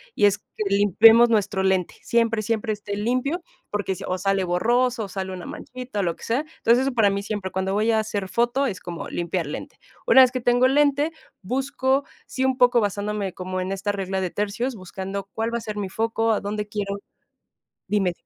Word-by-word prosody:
y 205 - +4
es 205 0 +4
que 215 - -6
limpiemos 210 +4 +6
nuestro 205 -3 +1
lente, 190 -2 +1
siempre, 230 -1 +1
siempre 215 0 -1
esté 205 -1 -5
limpio, 255 - -1 0.3
porque 205 -2 -2
si - - -9
o 185 - -2
sale 195 0 +1
borroso 235 +6 +1
o - - -8
sale 190 0 -5
una 180 -2 -7
manchita 250 -4 -6
o - - -1
lo 170 -2 -1
que - - -15
sea. 235 +3 +1 0.2
Entonces, 235 +2 +4
eso 270 0 -1
para 225 -4 +4
mí 200 0 -2
siempre, 205 -3 -3
cuando 190 0 -1
voy 215 +3 +2
a 220 - +3
hacer 205 -3 -3
foto, 240 +6 +1
es 190 -6 -5
como 175 -1 -6
limpiar 175 0 -2
lente. 145 - -7 0.3
Una - - +7
vez 255 -1 +6
que 255 - -2
tengo 245 +2 +4
lente, 290 +3 +2 0.3
busco, 265 +4 0 0.2
sí, 260 - -2
un 265 -1 +1
poco 245 -2 +5
basándome 205 -1 -2
como 185 0 -4
en 185 - -3
esta 195 +1 -2
regla 190 -1 -2
de 185 -2 -2
tercios, 220 +5 -2
buscando 195 +1 -6
cuál 225 +1 -2
va - - +1
a - - -10
ser 215 -2 -6
mi 200 - -2
foco, 225 +2 0
a - - -1
dónde 210 +1 -3
quiero 205 -1 -3 0.9
dime. 195 -4 +1
210 Hz, 210 wpm, -24 LUFS, 195-240 Hz, 0.9 s, Una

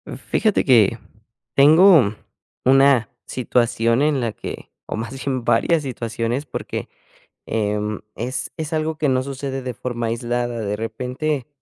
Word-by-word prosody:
Fíjate 215 -3 0
que, 115 -4 +4 0.6
tengo 150 - +6 0.5
una 135 -4 +5 0.2
situación 115 -1 +1
en 145 -3 +2
la 115 -2 -1
que - - -8
o - - -4
más 115 +4 -6
bien 130 -3 -1
varias 165 +6 +2
situaciones 120 +1 -3
porque, 130 - -5 0.6
em, 105 -1 -1
es 130 +3 -4
es 160 -1 -4
algo 155 0 -1
que 150 - +2
no 130 -1 +1
sucede 135 0 -4
de 125 -1 -4
forma 120 0 -4
aislada, 120 +1 -2
de 105 -2 -2
repente 125 +5 -3
125 Hz, 135 wpm, -21 LUFS, 115-140 Hz, 0.6 s, tengo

